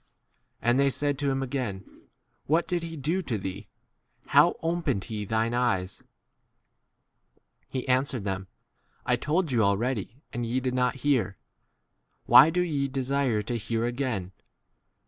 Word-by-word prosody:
And 120 +3 +3
they 140 0 +4
said 145 +1 -1
to 145 -1 0
him 135 0 0
again,J 125 -8 -4 0.6
What 160 +4 +2
did 175 -1 -1
he 165 -1 -6
do 160 +7 0
to 125 -11 -2
thee? 95 +1 -6 0.6
2? - - -25
how - - +5
opened 165 - 0
he 105 0 -5
thine 110 +3 0
eyes? 115 -7 0 1.7
He 130 -1 -4
answered 130 -3 +1
them, 95 -1 -3 0.6
I - - +3
told 160 +1 0
you 120 -3 +2
already 110 +4 -1
and 120 - -2
ye 120 +2 0
did 130 -1 -2
not 125 0 +1
hear: 115 -9 +1 0.9
why 150 - +8
do 180 +2 +1
ye 145 -6 0
desire 130 -4 0
to 120 +3 -2
hear 115 +2 -1
again 120 -7 -2
125 Hz, 145 wpm, -27 LUFS, 110-140 Hz, 1.7 s, why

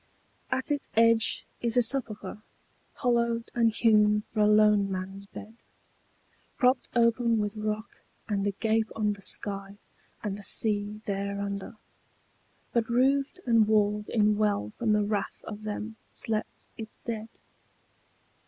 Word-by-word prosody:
At 260 +2 -2
its 290 -1 -2
edge 230 0 +3 0.2
is 235 0 0
a 245 - +6
sepulchre 225 -4 -1 0.5
hollowed 235 -2 0
and 235 -1 +3
hewn 210 -2 +3
for 220 - -2
a 210 - +5
lone 210 -2 +4
man's 195 +1 -5
bed, 215 +2 -10 1.0
Propped 255 -1 +2
open 235 0 +3
with 210 0 -2
rock 215 +1 -4 0.3
and 205 -1 -1
agape 220 +2 0
on 210 -2 +1
the 200 - -12
sky 195 0 -1 0.5
and 205 -1 -3
the - - -11
sea 210 0 +2
thereunder, 200 +1 -3 1.0
But 235 -1 +1
roofed 270 +7 +1
and 230 -3 +4
walled 210 -1 +1
in 210 -2 +2
well 205 - 0
from 220 - 0
the 210 0 +3
wrath 205 0 -3
of 210 -1 -8
them 215 +1 -5 0.2
slept 220 -1 -2
its 220 -1 -8
dead. 225 -1 -4
215 Hz, 135 wpm, -28 LUFS, 205-230 Hz, 1.0 s, a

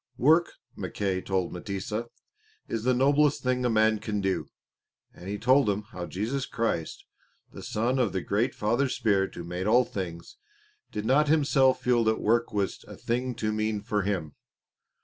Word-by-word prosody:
Work, 160 +7 +4 0.2
Mackay 95 -2 -2
told 95 -2 -1
M'tesa, 100 +5 -4 0.6
is 115 0 -3
the 130 - +4
noblest 145 +3 +3
thing 125 0 0
a 125 - +2
man 110 -1 +3
can 105 -1 -3
do, 95 -1 -1 0.7
and 90 - -10
he 105 - -2
told 130 +2 +4
him 100 +1 -1
how 90 -1 -6
Jesus 120 +8 -3
Christ, 115 -8 -2 0.5
the - - -10
Son 120 +5 -1
of 120 -6 +2
the 95 - -2
Great 110 +8 0
Father 120 +6 +1
Spirit 100 -5 0
who 85 - -6
made 90 +3 -4
all 120 +3 +5
things, 85 -3 -6 0.5
did 105 - -4
not 145 +5 +4
Himself 140 -3 +3
feel 120 -2 +3
that 110 0 +2
work 115 +1 +1
was 100 -4 -2
a - - -10
thing 125 +1 -2
too 110 -2 -1
mean 110 0 -1
for 105 -1 0
Him. 90 -7 -2
110 Hz, 170 wpm, -27 LUFS, 100-125 Hz, 0.7 s, all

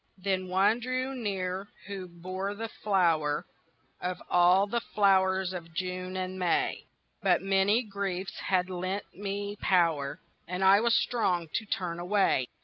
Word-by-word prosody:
Then 185 -1 -1
one 195 +5 +3
drew 255 +2 -2
near 195 -5 -3 0.2
who 195 -2 -6
bore 185 +3 -5
the 225 +2 -5
flower 165 -9 +1 0.6
Of 180 0 -3
all 180 +2 +5
the 235 +3 -1
flowers 190 -3 +2
of 165 -2 -8
June 185 +1 -3
and 185 0 -4
May; 180 -2 0 0.3
But 185 -3 +3
many 195 +4 +3
griefs 195 -3 -4
had 180 -1 +2
lent 185 +2 -4
me 205 +1 -4
power 165 -8 +1 0.3
And 180 +2 -2
I 195 +1 +7
was 235 +1 +3
strong 180 -9 0
to 220 - -2
turn 175 -3 -2
away. 180 -8 +2
190 Hz, 145 wpm, -29 LUFS, 180-200 Hz, 0.6 s, I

